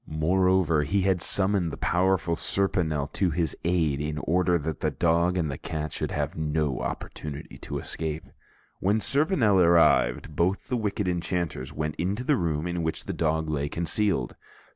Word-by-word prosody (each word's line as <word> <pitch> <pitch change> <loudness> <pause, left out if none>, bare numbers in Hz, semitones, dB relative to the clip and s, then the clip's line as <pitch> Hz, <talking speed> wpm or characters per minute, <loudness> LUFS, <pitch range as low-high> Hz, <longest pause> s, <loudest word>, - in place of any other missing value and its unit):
Moreover, 90 +1 +2
he 95 +8 0
had 95 -2 +1
summoned 95 -3 +2
the - - -7
powerful 90 -2 +1
Serponel 85 -6 +2
to 95 - +1
his 80 -2 -1
aid 80 -5 +1
in 75 0 -3
order 90 +3 +1
that 80 -1 -4
the - - 0
dog 85 +2 +1
and 80 -5 0
the 70 - -6
cat 75 -2 -4
should - - -2
have - - -2
no 75 -3 -1
opportunity 75 -1 -6
to - - -5
escape. 80 -1 -4 0.6
When 100 +4 +2
Serponel 135 - +2
arrived, 80 -5 +3
both 90 +5 0
the 125 - 0
wicked 105 -3 -2
enchanters 85 -6 -2
went 75 0 -4
to 100 +7 -1
the 145 +3 +2
room 80 - -1
in 85 -1 -2
which 80 0 -3
the - - -3
dog 80 0 0
lay 75 -2 -2
concealed. 85 - -1
85 Hz, 165 wpm, -26 LUFS, 75-95 Hz, 0.6 s, arrived